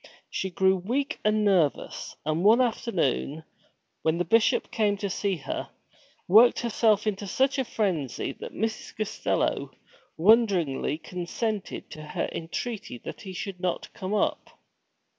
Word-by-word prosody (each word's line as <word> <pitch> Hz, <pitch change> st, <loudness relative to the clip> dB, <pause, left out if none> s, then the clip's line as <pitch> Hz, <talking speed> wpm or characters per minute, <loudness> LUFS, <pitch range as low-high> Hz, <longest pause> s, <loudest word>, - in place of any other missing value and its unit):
She 190 Hz, -, -2 dB
grew 190 Hz, +1 st, +3 dB
weak 250 Hz, +10 st, -2 dB
and 215 Hz, 0 st, +2 dB
nervous, 180 Hz, -8 st, +1 dB
and 155 Hz, +3 st, 0 dB
one 220 Hz, +4 st, +6 dB
afternoon, 170 Hz, -, 0 dB, 0.6 s
when 160 Hz, +1 st, +1 dB
the 175 Hz, -, 0 dB
Bishop 225 Hz, +6 st, +3 dB
came 210 Hz, -2 st, +1 dB
to 200 Hz, -1 st, -3 dB
see 195 Hz, +1 st, 0 dB
her, 145 Hz, -, -5 dB, 0.6 s
worked 225 Hz, +6 st, +6 dB
herself 220 Hz, -3 st, +2 dB
into 205 Hz, -1 st, -2 dB
such 265 Hz, +7 st, +1 dB
a -, -, +2 dB
frenzy 185 Hz, -, -1 dB
that -, -, -7 dB
Mrs. 220 Hz, +1 st, -4 dB
Costello 215 Hz, +1 st, -1 dB, 0.5 s
wonderingly 180 Hz, -, +3 dB
consented 185 Hz, +5 st, -4 dB
to 155 Hz, -, -8 dB
her 150 Hz, -, -3 dB
entreaty 200 Hz, -, -5 dB
that -, -, -7 dB
he 190 Hz, -2 st, -7 dB
should 190 Hz, 0 st, -5 dB
not 180 Hz, -1 st, -2 dB
come 190 Hz, +3 st, -3 dB
up. -, -, -1 dB
200 Hz, 140 wpm, -27 LUFS, 175-220 Hz, 0.6 s, one